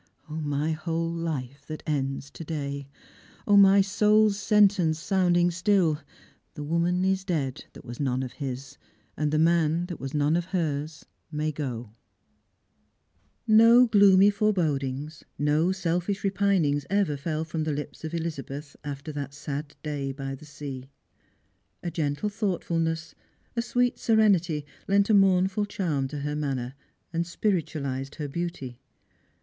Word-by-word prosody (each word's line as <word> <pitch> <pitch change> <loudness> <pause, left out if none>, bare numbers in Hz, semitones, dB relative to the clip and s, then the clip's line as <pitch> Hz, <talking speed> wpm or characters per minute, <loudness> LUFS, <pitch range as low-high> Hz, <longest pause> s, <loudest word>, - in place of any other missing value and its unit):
0, 155 +1 -5
my 150 +1 -1
whole 165 +1 -2
life 145 -5 -4
that 155 0 -7
ends 140 -1 -2
to - - -8
day! 140 -3 -4 0.6
0, 205 - +4
my 195 0 +7
soul's 210 +1 +3
sentence, 195 -6 +3
sounding 175 0 +2
still; 175 -4 +2 0.3
' - - -35
The 150 - -5
woman 170 +4 +1
is 190 0 +1
dead, 150 -9 -2
that - - -13
was 120 0 -8
none 130 -2 0
of 125 - -5
his; 135 -2 -6 0.4
And 150 -1 -1
the 155 - +2
man, 165 +1 +3
that 175 -3 -7
was 135 +2 -5
none 150 +2 +2
of 175 0 0
hers, 155 -4 -3 0.3
may 155 0 -1
go! 125 -7 -5 0.5
' - - -45 0.2
" - - -42 0.2
No 240 +2 +8
gloomy 200 -3 +6
forebodings, 150 -8 -1
no 150 +4 +2
selfish 185 +1 -1
repiniugs 190 -7 +2
ever 200 -6 +1
fell 155 +2 -3
from 160 0 -3
the 155 - -1
lips 145 +2 -6
of 160 +1 -4
Elizabeth 150 -3 -5
after 145 +1 -6
that 140 -1 -6
sad 145 0 -5
day 145 -3 -3
by 135 0 -5
the 135 +3 -10
sea. 135 -3 -8 0.9
A 175 - -3
gentle 150 +4 -1
thoughtfulness, 170 -6 -2 0.4
a 235 - +1
sweet 245 +1 0
serenity, 185 -9 +3 0.2
lent 200 +2 +3
a - - +5
mournful 195 +1 +3
charm 160 -9 -1
to 145 +1 -6
her 150 +1 -2
manner, 135 -4 -2 0.4
and 170 +1 -1
spiritualised 145 -8 -2
her 150 -3 -4
beauty. 140 -6 -5
160 Hz, 150 wpm, -27 LUFS, 145-185 Hz, 0.9 s, No